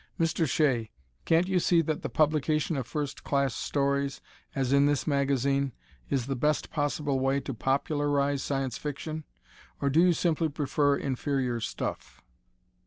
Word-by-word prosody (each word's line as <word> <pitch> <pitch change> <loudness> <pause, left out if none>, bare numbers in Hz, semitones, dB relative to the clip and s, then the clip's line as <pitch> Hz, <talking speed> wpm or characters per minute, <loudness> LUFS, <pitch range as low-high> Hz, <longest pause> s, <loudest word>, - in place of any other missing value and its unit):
Mr. 165 -2 +1
Shea, 125 -7 +2 0.4
can't 165 +2 +3
you 190 -1 +2
see 170 0 +3
that 155 -1 -2
the - - -3
publication 155 +1 +1
of 130 -4 -3
first 145 -1 -4
class 140 -3 +1
stories, 140 +1 -1 0.4
as 135 -1 +1
in 140 +1 +5
this 145 -2 +1
magazine, 140 -1 +1 0.4
is 130 -4 0
the 135 +1 -2
best 150 +4 0
possible 145 -2 0
way 135 +1 +2
to 135 - -5
popularize 140 +2 0
Science 135 -2 -2
Fiction? 155 +1 -5 0.5
Or 140 - +1
do 155 - +4
you 180 0 +5
simply 165 -1 +1
prefer 145 0 +1
inferior 130 -2 -1
stuff? - - -5
140 Hz, 150 wpm, -28 LUFS, 135-150 Hz, 0.5 s, in